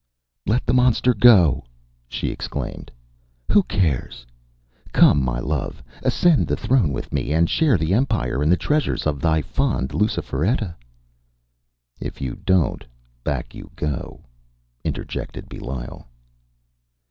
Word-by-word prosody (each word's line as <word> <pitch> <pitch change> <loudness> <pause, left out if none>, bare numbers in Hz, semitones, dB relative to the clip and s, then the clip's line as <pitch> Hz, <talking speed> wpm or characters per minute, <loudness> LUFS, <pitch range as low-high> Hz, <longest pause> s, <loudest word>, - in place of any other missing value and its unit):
“Let 115 +5 +1
the 120 - +1
monster 125 0 +4
go!” 100 - +6 0.4
she - - -3
exclaimed; - - -5 0.6
“who 205 - +6
cares? 80 - -1 0.7
Come, 70 - +5
my 60 -2 -1
love, 75 +1 -3 0.2
ascend 175 -5 +3
the - - +1
throne 120 - +2
with 70 - -5
me, - - -1
and 80 +2 +3
share 150 - +3
the 80 +2 0
empire 110 - 0
and 75 +3 +3
the 90 - +4
treasures 150 0 0
of 75 -2 -1
thy 80 -2 +2
fond 125 - -1
Luciferetta.” 95 - -1 1.3
“If - - -6
you 65 -3 -3
don’t, 95 -4 +1 0.4
back - - -3
you - - -10
go,” 75 -3 -4 0.6
interjected - - -5
Belial. 65 -1 -7
85 Hz, 125 wpm, -22 LUFS, -, 1.3 s, go